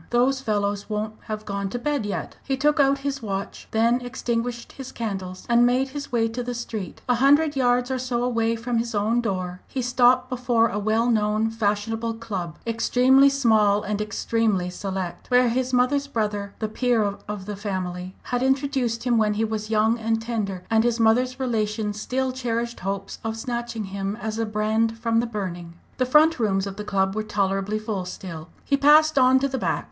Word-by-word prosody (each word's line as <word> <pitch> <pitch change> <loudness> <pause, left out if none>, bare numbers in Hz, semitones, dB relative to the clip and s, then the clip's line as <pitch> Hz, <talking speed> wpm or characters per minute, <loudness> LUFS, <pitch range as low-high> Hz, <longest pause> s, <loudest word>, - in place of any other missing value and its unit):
those 260 +3 +2
fellows 205 -3 -1
won't 215 0 -2
have 215 0 -5
gone 200 -1 -3
to 245 - -3
bed 265 -3 -1
yet!" 205 - -4
He 270 -1 -1
took 295 +3 +2
out 275 0 +4
his 275 -1 -2
watch, 200 -3 -5
then 230 +3 +2
extinguished 240 -1 -3
his 270 -2 -9
candles, 190 -5 -5
and 240 0 +4
made 255 +2 +2
his 285 +1 -7
way 230 -2 +2
to 235 +2 -4
the 245 0 -4
street. 220 -5 -6
A 250 - +4
hundred 290 +2 +4
yards 250 -1 +2
or 260 - -1
so 245 -1 -1
away 230 -2 +1
from 235 +1 -1
his 230 -1 -3
own 220 +4 +2
door 185 -5 -3
he 265 - -4
stopped 250 0 +3
before 240 -2 +1
a 210 - -2
well 220 +3 +1
known 215 -1 +1
fashionable 225 +1 -1
club, 190 -8 -5
extremely 255 +4 +4
small, 220 -6 +3
and 210 0 -2
extremely 210 -3 0
select, 190 -1 -5
where 250 -1 +4
his 255 +2 -1
mother's 260 +3 +2
brother, 210 -5 -2
the 220 - -2
peer 235 0 +1 0.2
of 205 -2 -5
the 210 0 -5
family, 185 -2 -4
had 245 0 -2
introduced 265 -3 0
him 240 -2 +2
when 210 -1 +2
he 220 +2 +1
was 215 -1 -4
young 220 +2 +2
and 225 0 0
tender, 215 -5 -3
and 220 0 +4
his 240 0 +1
mother's 250 +3 +2
relations 215 -4 -1
still 260 +2 -1
cherished 235 -2 -3
hopes 195 +1 -4
of 225 0 -3
snatching 235 -1 -4
him 195 +1 -4
as 220 0 -4
a 225 - 0
brand 220 +2 0
from 230 0 +1
the 235 - 0
burning. 175 -6 -5 0.2
The 255 - +2
front 305 +3 +5
rooms 195 -4 +1
of 195 -1 -6
the 210 - -4
club 195 -1 0
were 215 - 0
tolerably 200 0 -1
full 215 -4 -3
still. 180 -3 -8 0.2
He 280 - +2
passed 300 +1 +5
on 255 0 +6
to 275 +1 +1
the 265 -1 -3
back. - - 0
225 Hz, 195 wpm, -24 LUFS, 210-250 Hz, 0.2 s, on